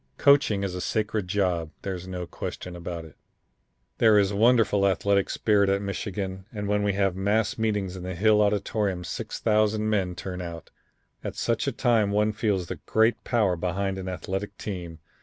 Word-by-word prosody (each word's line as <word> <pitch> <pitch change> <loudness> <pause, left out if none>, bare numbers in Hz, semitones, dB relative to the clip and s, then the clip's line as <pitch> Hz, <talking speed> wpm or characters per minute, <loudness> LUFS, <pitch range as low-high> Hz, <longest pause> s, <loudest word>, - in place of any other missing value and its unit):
Coaching 140 -8 +4
is 95 -2 -2
a 90 - -4
sacred 105 -2 -1
job. 90 -4 0
There's 95 -2 -4
no 90 -1 -4
question 90 +1 -6
about 85 -1 -6
it. 80 - -14 0.8
"There 110 -2 +6
is 100 -1 +3
a - - -3
wonderful 110 -3 +4
athletic 100 +2 +2
spirit 100 -2 +2
at 100 0 +2
Michigan, 100 -1 -4
and 105 -2 -4
when 105 0 +1
we 100 -1 +1
have 95 -2 +1
mass 105 +5 +1
meetings 105 -4 -1
in 95 - -7
the 90 0 -5
Hill 105 +3 +4
Auditorium 100 -2 0
6000 110 +3 0
men 95 -4 0
turn 90 0 -5
out. 85 -2 -8 0.5
At - - -5
such - - -1
a - - +2
time 115 -4 +2
one 105 +1 +2
feels 105 -4 0
the - - -6
great 110 +2 +2
power 105 -7 +2
behind 95 +3 -2
an 95 0 -5
athletic 95 +3 -4
team. 90 -5 -6
100 Hz, 175 wpm, -26 LUFS, 90-105 Hz, 0.8 s, There